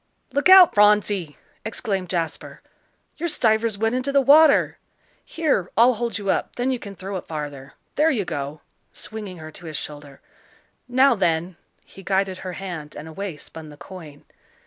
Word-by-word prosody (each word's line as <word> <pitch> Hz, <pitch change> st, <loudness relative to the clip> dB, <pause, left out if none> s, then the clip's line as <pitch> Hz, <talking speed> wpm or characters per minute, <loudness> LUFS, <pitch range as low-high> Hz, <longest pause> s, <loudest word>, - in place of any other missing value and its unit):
"Look 285 Hz, +6 st, +2 dB
out, 375 Hz, -2 st, +9 dB
Phronsie!" 205 Hz, -6 st, +2 dB, 0.3 s
exclaimed 195 Hz, -4 st, -3 dB
Jasper. 170 Hz, -3 st, -4 dB, 0.5 s
"Your 340 Hz, +2 st, -2 dB
stuivers 225 Hz, -6 st, +1 dB
went 225 Hz, +2 st, 0 dB
into 255 Hz, +2 st, -1 dB
the 280 Hz, -, +4 dB
water. 285 Hz, +3 st, +5 dB, 0.4 s
Here, 290 Hz, -, -1 dB
I'll 240 Hz, +3 st, +6 dB
hold 235 Hz, -1 st, -3 dB
you 200 Hz, -2 st, -1 dB
up, -, -, -2 dB
then 250 Hz, +2 st, -1 dB
you 255 Hz, -, -2 dB
can 200 Hz, -2 st, -9 dB
throw 195 Hz, +1 st, -5 dB
it -, -, -9 dB
farther. 145 Hz, -3 st, -7 dB, 0.2 s
There 310 Hz, +2 st, +4 dB
you 225 Hz, -, -1 dB
go," 145 Hz, 0 st, -5 dB, 0.3 s
swinging 210 Hz, -4 st, -8 dB
her 155 Hz, -1 st, -10 dB
to 170 Hz, +2 st, -11 dB
his 155 Hz, -3 st, -4 dB
shoulder. 145 Hz, -2 st, -8 dB, 0.7 s
"Now, 260 Hz, +2 st, +4 dB
then" 175 Hz, -3 st, -1 dB, 0.3 s
he 195 Hz, -, -14 dB
guided 190 Hz, 0 st, -1 dB
her 185 Hz, -1 st, -6 dB
hand, 170 Hz, -6 st, -7 dB
and 150 Hz, -, -8 dB
away 175 Hz, 0 st, -6 dB
spun 155 Hz, +1 st, -11 dB
the 150 Hz, -, -13 dB
coin. 155 Hz, -5 st, -12 dB
195 Hz, 170 wpm, -23 LUFS, 160-240 Hz, 0.7 s, out